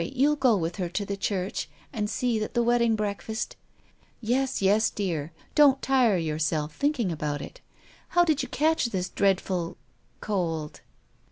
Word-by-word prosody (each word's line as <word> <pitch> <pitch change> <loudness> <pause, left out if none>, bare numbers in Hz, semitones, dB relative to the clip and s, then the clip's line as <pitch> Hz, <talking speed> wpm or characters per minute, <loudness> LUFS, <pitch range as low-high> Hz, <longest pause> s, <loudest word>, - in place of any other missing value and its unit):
You'll 275 - +2
go 255 -6 +3
with 170 +1 -3
her 180 -3 -2
to 205 +3 -2
the 200 - -3
church, 195 -1 -2 0.2
and 210 -4 -2
see 240 -2 0
that 215 +3 -4
the 240 - +3
wedding 235 -1 +3
breakfast 215 +1 -3 0.3
" - - -35
"Yes, 250 +3 0
yes, 205 +3 +3
dear. 165 -6 -3 0.2
Don't 280 -3 +6
tire 255 -8 +3
yourself, 155 -1 -1
thinking 280 - 0
about 150 -2 -2
it 140 - -9
all. - - -29 0.2
How 350 0 +4
did 310 -3 +2
you - - -5
catch 315 +1 +2
this 185 -6 -2
dreadful 185 -3 0 0.2
— 115 - -39
cold 165 -7 -2
210 Hz, 170 wpm, -27 LUFS, 170-250 Hz, 0.3 s, Don't